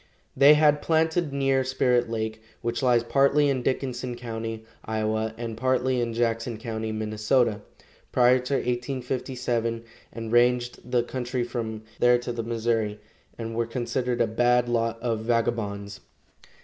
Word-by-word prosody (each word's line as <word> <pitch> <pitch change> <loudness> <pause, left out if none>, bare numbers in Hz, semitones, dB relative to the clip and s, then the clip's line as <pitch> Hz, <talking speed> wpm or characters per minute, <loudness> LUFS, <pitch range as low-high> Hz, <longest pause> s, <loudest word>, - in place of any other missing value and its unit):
They 145 +2 +8
had 150 -1 +4
planted 160 0 +1
near 135 -1 +1
Spirit 125 -2 +1
lake, 110 -1 -3 0.2
which 120 0 -1
lies 120 -3 +3
partly 140 +3 +3
in 130 -2 0
Dickinson 125 -1 -2
county, 115 -2 -5 0.2
Iowa, 110 0 -1
and 115 -1 -5
partly 130 +1 +1
in 115 -1 -2
Jackson 115 0 -1
county, 110 -1 -4
Minnesota, 110 +1 +1 0.5
prior 125 +1 +5
to 125 +2 -2
1857, 125 -2 -2 0.3
and 115 -1 -6
ranged 120 0 +2
the 125 -1 +2
country 125 0 -3
from 115 -3 -4 0.2
there 120 0 +5
to 120 0 -5
the 120 -1 -3
Missouri, 115 -2 -1 0.4
and 115 -1 -5
were 115 0 0
considered 120 +1 -2
a - - +5
bad 120 +2 +2
lot 115 -1 0
of 115 -3 0
vagabonds. 110 -3 -1
120 Hz, 140 wpm, -26 LUFS, 115-125 Hz, 0.5 s, They